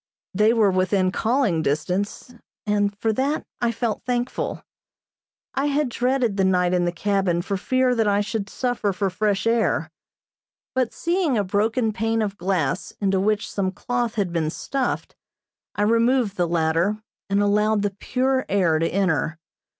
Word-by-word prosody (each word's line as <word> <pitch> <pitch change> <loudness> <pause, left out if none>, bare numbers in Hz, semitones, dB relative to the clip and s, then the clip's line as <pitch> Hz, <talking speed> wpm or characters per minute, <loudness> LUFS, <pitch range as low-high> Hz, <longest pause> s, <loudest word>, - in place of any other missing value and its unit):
They 210 +3 +4
were 220 -4 +3
within 185 0 +1
calling 225 - +1
distance, 180 - -2 0.3
and 205 -1 0
for 220 +1 0
that 275 +6 -1 0.2
I 240 -1 +2
felt 230 -2 -2
thankful. 245 0 -2 0.9
I 275 +2 0
had 290 -1 +1
dreaded 245 -3 0
the 190 - +2
night 180 -1 +2
in 175 -1 +2
the 175 - +1
cabin 185 -1 0
for 195 - -2
fear 255 +6 +1
that 225 -3 +1
I 200 0 +3
should 205 -1 -3
suffer 245 -5 -1
for 195 0 -1
fresh 200 +1 0
air, 220 -8 +1 0.8
but 255 -3 0
seeing 340 -6 0
a 205 - +2
broken 220 +4 0
pane 225 0 0
of 200 -2 -3
glass 180 -4 -1
into 195 -2 +1
which 210 +2 +1
some 190 -2 -1
cloth 240 +3 -2
had 195 -5 -1
been 160 -2 0
stuffed, 260 - -3 0.6
I 205 - +1
removed 230 0 +2
the 175 -2 +1
latter, 170 +6 +1 0.3
and 200 0 +2
allowed 210 +1 +2
the 205 - 0
pure 260 +1 0
air 175 -5 +2
to 165 - +1
enter. 165 -5 0
205 Hz, 160 wpm, -23 LUFS, 185-235 Hz, 0.9 s, They